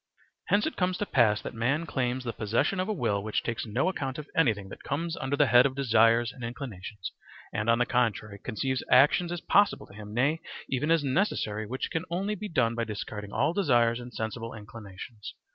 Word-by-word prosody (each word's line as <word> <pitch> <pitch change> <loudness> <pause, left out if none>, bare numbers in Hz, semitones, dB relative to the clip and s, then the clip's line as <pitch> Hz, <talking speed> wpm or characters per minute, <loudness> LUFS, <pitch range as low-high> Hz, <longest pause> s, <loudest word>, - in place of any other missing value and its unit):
Hence 205 +1 +3
it 315 - -3
comes 180 -1 +1
to 205 - -1
pass 110 - +3
that - - -5
man 130 +8 0
claims 130 -4 -1
the 120 -2 -3
possession 115 - 0
of 185 - 0
a - - -1
will 115 - 0
which 110 +1 -1
takes 115 0 -3
no 120 - 0
account 135 -8 -2
of 150 -1 -7
anything 110 -11 +2
that - - -10
comes 165 +4 -2
under 135 +2 -2
the 145 - +5
head 120 +1 +6
of 130 - -7
desires 115 -2 +4
and 125 - -11
inclinations 110 -5 -6 0.4
and, 105 +2 -1
on 115 - +5
the 125 - +2
contrary, 110 -4 0
conceives 130 +2 -2
actions 170 +7 +5
as 175 -1 -3
possible 205 0 +3
to - - -17
him, 105 0 -9
nay, 140 +8 +1 0.3
even 135 +4 -1
as 165 -2 +4
necessary 130 - 0
which 130 +4 -3
can 165 +2 -2
only 195 +5 -1
be 210 +1 -5
done 115 -7 +2
by 115 0 -1
disregarding 105 -1 -6
all 145 +5 +1
desires 120 - +3
and 125 0 -9
sensible 115 +1 -4
inclinations. 105 0 -9
125 Hz, 210 wpm, -28 LUFS, 110-150 Hz, 0.4 s, head